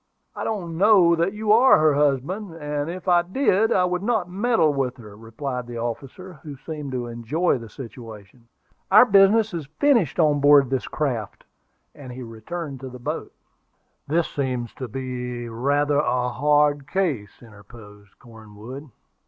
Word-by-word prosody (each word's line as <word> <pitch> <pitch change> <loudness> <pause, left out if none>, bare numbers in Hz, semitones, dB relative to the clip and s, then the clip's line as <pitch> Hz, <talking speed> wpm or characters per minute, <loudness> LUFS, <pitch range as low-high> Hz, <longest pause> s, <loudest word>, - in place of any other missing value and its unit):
"I - - -5
don't 170 -6 -4
know 190 -4 +5
that 170 +3 0
you 210 0 -1
are 240 +5 +6
her 155 -1 +3
husband; 150 +7 -1
and 150 -1 -4
if 185 +2 -7
I 175 -1 +5
did, 210 +2 +1
I 180 - +3
would 180 0 -2
not 215 -4 0
meddle 200 -6 +2
with 130 -2 -2
her," 105 -4 -13
replied 120 +3 -6
the 120 -1 -7
officer, 135 +9 -6
who 145 -2 -9
seemed 150 -1 -7
to 125 -1 -3
enjoy 120 +7 -1
the 115 -1 -10
situation. 115 -2 -11 0.4
"Our 215 +5 +8
business 205 0 +4
is 160 -5 -5
finished 235 - +2
on 150 -3 +3
board 145 0 +6
of 130 - -9
this 130 -2 -1
craft:" 125 -9 -3 0.5
and 130 -3 -11
he 125 +1 -8
returned 135 +6 -7
to 130 0 -8
the 125 - -10
boat. 125 - -5 0.8
"This 165 +3 +1
seems 125 -4 -3
to 130 - -7
be 125 -1 -5
rather 140 +5 0
a 125 -4 0
hard 145 +2 +2
case," 150 - -2
interposed 105 -2 -16
Cornwood. 115 +5 -12
145 Hz, 160 wpm, -23 LUFS, 120-175 Hz, 0.8 s, Our